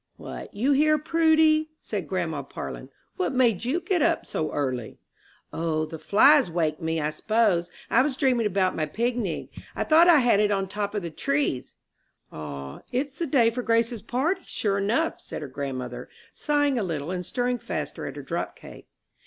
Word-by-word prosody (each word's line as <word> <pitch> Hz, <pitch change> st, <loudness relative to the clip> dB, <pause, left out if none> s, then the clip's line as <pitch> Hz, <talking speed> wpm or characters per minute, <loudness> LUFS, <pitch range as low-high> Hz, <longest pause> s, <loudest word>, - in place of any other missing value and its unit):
"What, -, -, -8 dB
you 245 Hz, +8 st, 0 dB
here, 305 Hz, +2 st, +4 dB
Prudy?" 315 Hz, 0 st, +3 dB
said 195 Hz, -7 st, -4 dB
grandma 160 Hz, -5 st, -2 dB
Parlin. 135 Hz, -, -7 dB, 0.3 s
"What 370 Hz, -8 st, -1 dB
made 235 Hz, -5 st, +2 dB
you 280 Hz, +8 st, +1 dB
get 360 Hz, -2 st, 0 dB
up 335 Hz, +1 st, +2 dB
so 155 Hz, -, -2 dB
early?" 130 Hz, -5 st, -3 dB, 0.6 s
"O, 160 Hz, -1 st, -1 dB
the 160 Hz, +1 st, -8 dB
flies 270 Hz, -, +5 dB
waked 160 Hz, -2 st, -1 dB
me, 160 Hz, 0 st, -1 dB
I 150 Hz, 0 st, -1 dB
s'pose. 195 Hz, -1 st, +1 dB, 0.2 s
I 235 Hz, -, +4 dB
was 265 Hz, -1 st, -1 dB
dreaming 250 Hz, -6 st, +2 dB
about 190 Hz, -2 st, +1 dB
my 155 Hz, -1 st, -1 dB
pignig. 230 Hz, +1 st, -2 dB, 0.3 s
I -, -, 0 dB
thought 325 Hz, +2 st, +6 dB
I 340 Hz, -3 st, +8 dB
had 245 Hz, -6 st, +4 dB
it 210 Hz, -1 st, +3 dB
on 195 Hz, -2 st, 0 dB
top 205 Hz, +1 st, -3 dB
o' -, -, +1 dB
the 170 Hz, -4 st, -6 dB
trees." 275 Hz, -, -1 dB, 0.6 s
"Ah, 70 Hz, -3 st, -7 dB
it's 265 Hz, +3 st, -1 dB
the 335 Hz, -, -1 dB
day 245 Hz, -5 st, +4 dB
for 250 Hz, +2 st, -3 dB
Grace's 230 Hz, -1 st, +1 dB
party, 285 Hz, -, -1 dB
sure 200 Hz, -2 st, -1 dB
enough," 235 Hz, +12 st, 0 dB
said -, -, -6 dB
her -, -, -5 dB
grandmother, 130 Hz, -2 st, -5 dB, 0.2 s
sighing 290 Hz, -3 st, +1 dB
a -, -, -1 dB
little, 160 Hz, -3 st, -3 dB
and 180 Hz, -1 st, -3 dB
stirring 245 Hz, +6 st, -1 dB
faster -, -, -4 dB
at -, -, -7 dB
her -, -, -7 dB
drop -, -, -3 dB
cake. -, -, -13 dB
215 Hz, 185 wpm, -26 LUFS, -, 0.6 s, I